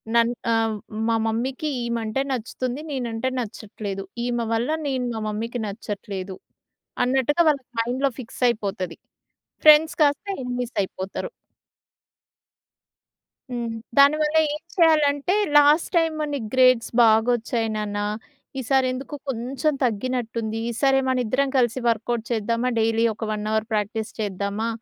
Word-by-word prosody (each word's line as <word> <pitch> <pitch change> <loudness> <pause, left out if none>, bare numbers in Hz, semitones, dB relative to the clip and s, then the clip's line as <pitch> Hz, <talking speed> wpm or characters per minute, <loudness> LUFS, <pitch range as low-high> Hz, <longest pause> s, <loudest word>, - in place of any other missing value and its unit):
నన్ 235 0 +4 0.2
ఆహ్, 225 -1 +1 0.3
మా 230 - +2
మమ్మీ‌కి 255 +7 -2
ఈమంటే 235 +1 -1
నచ్చుతుంది 255 +3 -3
నేనంటే 240 -2 -2
నచ్చట్లేదు. 205 -3 -5 0.2
ఈమె 240 -1 -1
వల్ల 230 +5 0 0.2
నేను 260 -2 -1
మా 220 - -4
మమ్మీ‌కి 230 +3 -3
నచ్చట్లేదు. 200 -2 -6 0.7
అన్నట్టుగా 265 +6 +2
వాళ్ళకి 275 -4 -1
మైండ్‌లో 255 +4 0
ఫిక్స్ 240 +1 -9
అయిపోతది. 195 -6 -3 0.7
ఫ్రెండ్స్ 310 +2 +7
కాస్త 290 +6 +2 0.2
ఎనిమీస్ 245 -1 -3
అయిపోతారు. 190 - -5 2.2
హ్మ్. 235 -1 -3 0.3
దానివల్ల 300 +2 +5 0.2
ఏం 300 - -4 0.2
చేయాలంటే 310 -1 +3 0.2
లాస్ట్‌టైమ్ 315 +2 +4
నీకు 250 -7 -3
గ్రేడ్స్ 255 -2 +4
బాగొచ్చాయి 225 +1 +2
నాన్న, 210 -1 -3 0.6
ఈసారి 260 +1 +2
ఎందుకొ 265 +3 -6
కొంచెం 270 +5 -1
తగ్గినట్టుంది. 230 -1 -2
ఈసారి 270 +3 +2
మనిద్దరం 255 +2 +1
కలిసి 240 +1 +1
వర్క్‌‌ఔట్ 230 0 0
చేద్దామా? 230 +2 0
డైలీ 225 +1 +2
ఒక 220 0 -5
1 210 0 -3
అవర్ 220 0 0
ప్రాక్టీస్ 215 +1 -1
చేద్దామా? 200 +2 -2
235 Hz, 115 wpm, -24 LUFS, 220-270 Hz, 2.2 s, ఫ్రెండ్స్